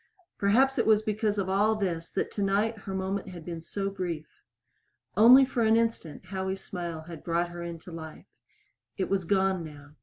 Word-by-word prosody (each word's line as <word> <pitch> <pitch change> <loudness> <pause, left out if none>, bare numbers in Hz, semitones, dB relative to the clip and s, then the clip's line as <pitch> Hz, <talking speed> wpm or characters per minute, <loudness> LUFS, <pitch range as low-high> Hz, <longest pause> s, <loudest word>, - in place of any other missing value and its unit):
Perhaps 255 +7 +3
it - - +1
was 215 -1 +5
because 215 -1 0
of 195 -2 0
all 205 +3 +2
this 175 -5 -2
that - - -2
tonight 205 +3 +1
her 190 - -3
moment 190 +1 -2
had 175 -3 -10
been 170 -2 -5
so 195 +4 -3
brief. 175 -5 -4 0.9
Only 245 +6 +8
for 255 -2 -2
an 220 0 +4
instant 225 -8 -2
Howie's 190 0 -4
smile 170 -3 -5
had 165 -1 -10
brought 170 +1 0
her 175 0 -8
into 170 0 -7
life. 160 -1 -9 0.7
It 190 - -1
was 195 -3 +1
gone 190 -1 +1
now. 145 -2 -11
190 Hz, 180 wpm, -28 LUFS, 170-210 Hz, 0.9 s, Only